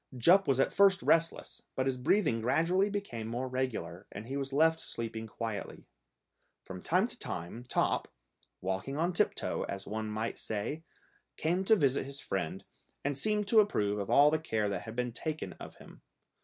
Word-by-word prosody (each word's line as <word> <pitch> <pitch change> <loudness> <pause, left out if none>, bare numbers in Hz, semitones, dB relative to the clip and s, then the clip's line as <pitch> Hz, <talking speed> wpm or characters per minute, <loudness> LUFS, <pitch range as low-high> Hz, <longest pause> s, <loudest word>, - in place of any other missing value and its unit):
Jup 180 +10 +6
was 135 -1 +2
at - - +2
first 195 -1 +5
restless, 165 0 +1
but 130 - 0
his 135 -1 +1
breathing 130 - +2
gradually 165 - +2
became 195 - -4
more 120 +3 -3
regular, 125 -8 -3
and 105 +2 -7
he 135 +3 -5
was 135 -1 -3
left 160 +3 +4
sleeping 115 -1 -5
quietly. 110 -2 -5 0.8
From 90 -1 -8
time 185 - +2
to - - -12
time 90 +8 -5
Top, - - +1 0.5
walking 95 +9 -2
on 170 +3 +1
tip - - +2
toe, - - -2
as 95 0 -5
one 110 +1 -3
might 110 +2 -3
say, 110 +9 -3 0.6
came 175 +4 +1
to 220 - +6
visit 140 -6 +1
his 140 0 -7
friend, 95 -1 -3 0.4
and 145 0 0
seemed 210 +7 0
to 225 - +7
approve 105 - +2
of 100 - -4
all 145 +1 +6
the 155 - +1
care 110 -9 -1
that 100 -3 -2
had 110 0 -7
been 125 0 -1
taken 155 +6 -4
of - - -9
him. - - -15
130 Hz, 185 wpm, -31 LUFS, 110-165 Hz, 0.8 s, to